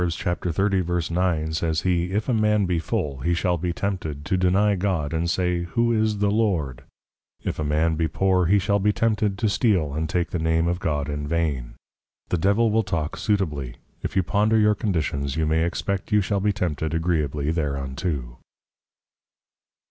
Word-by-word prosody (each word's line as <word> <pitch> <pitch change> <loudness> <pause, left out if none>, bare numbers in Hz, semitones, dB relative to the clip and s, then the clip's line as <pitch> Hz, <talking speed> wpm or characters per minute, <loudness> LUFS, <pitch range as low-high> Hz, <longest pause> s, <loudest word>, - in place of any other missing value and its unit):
30.9._ 90 -1 0
says 80 -1 0
he, 90 -2 +1
if 105 +3 -1
a 130 - +1
man 105 -2 +2
be 90 -2 0
Full, 70 -3 -2
he 85 +6 0
shall 90 0 0
be 90 +1 -1
tempted, 85 -6 -3
to 85 - 0
deny 95 +3 +3
God, 90 -6 -1
and 85 +1 0
say, 90 -1 0
who 115 +7 +1
is 110 -1 +1
the 100 0 +1
Lord? 90 - 0 0.6
if - - -3
a - - 0
man 80 +2 +1
be 80 0 +1
Poor, 90 +2 +2
he 100 +4 +4
shall 100 +1 +1
be 105 +2 +3
tempted, 105 -2 0
to 110 - +1
steal, 100 - +1
and 80 +1 -2
take 90 +1 -1
the 90 - -1
Name 80 +1 +1
of 85 0 0
God 75 -5 -1
in 75 0 -3
vain. 75 -7 -1 0.5
The 90 - 0
Devil 100 +6 +3
will 110 +1 +3
talk 80 -7 -2
suitably; 75 - -1 0.3
if - - -4
you 95 - +3
ponder 105 +5 +2
your 105 -1 +4
Conditions, 75 -9 -1
you 80 -1 +1
may 80 +1 +2
expect 95 +4 -2
you 105 - +5
shall 100 +1 0
be 105 +2 +2
tempted 80 -5 -2
agreeably 75 -3 0
thereunto. 70 -3 -3
85 Hz, 180 wpm, -24 LUFS, 80-100 Hz, 0.6 s, you